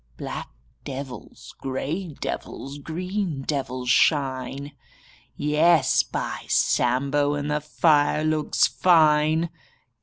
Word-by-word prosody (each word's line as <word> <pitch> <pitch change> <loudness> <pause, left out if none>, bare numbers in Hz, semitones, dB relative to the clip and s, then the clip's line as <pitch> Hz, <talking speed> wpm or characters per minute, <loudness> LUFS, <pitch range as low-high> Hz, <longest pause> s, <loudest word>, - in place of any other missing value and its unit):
Black - - -6 0.3
devils, 135 -4 -8
grey 145 +5 -4
devils, 140 +2 -5
green 175 -1 -3
devils 130 -3 -2
shine 140 0 +1 0.4
— - - -25 0.2
Yes, 150 -1 +3
by - - -5
Sambo, 140 +4 +2
And 145 0 -3
the 150 0 0
fire 150 -1 +2
looks 155 -1 +2
fine! 160 -1 +3
145 Hz, 95 wpm, -24 LUFS, 135-155 Hz, 0.4 s, Yes